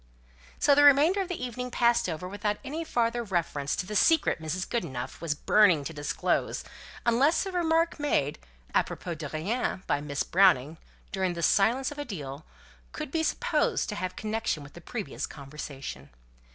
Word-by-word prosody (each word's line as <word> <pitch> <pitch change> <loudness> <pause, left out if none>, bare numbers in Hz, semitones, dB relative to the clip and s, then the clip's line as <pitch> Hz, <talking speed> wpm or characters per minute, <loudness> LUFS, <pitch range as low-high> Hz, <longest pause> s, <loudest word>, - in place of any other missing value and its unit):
So 285 - +4
the 290 +1 +5
remainder 295 +7 +6
of 380 - -3
the 345 -8 -4
evening 250 +1 -5
passed 235 -5 +2
over 170 +2 -4
without 205 +2 -2
any 300 +5 -4
further 240 -5 0
reference 165 -8 -1
to - - -3
the 210 +3 -5
secret 320 - +3
Mrs. 160 +4 -3
Goodenough 150 - -4
was 165 -3 -1
burning 180 -3 +4
to 160 - -5
disclose, 145 -1 -1 0.4
unless 270 +10 +3
a 385 - -4
remark 330 -2 +1
made 150 - 0 0.3
łpropos 175 -2 -1
de 150 -3 -5
rien 190 - -2
by 145 - 0
Miss 145 -1 -2
Browning, 165 -5 +3 0.3
during 190 -2 0
the 170 - -4
silence 235 - +3
of 290 - -8
a 290 - -3
deal, 145 - -6 0.5
could - - -5
be 325 - 0
supposed 320 - 0
to 210 - -3
have 185 -2 -4
connection 215 -7 -2
with 140 - -13
the 175 - -11
previous 220 +2 -5
conversation. 140 -1 -8
200 Hz, 170 wpm, -28 LUFS, 155-260 Hz, 0.5 s, remainder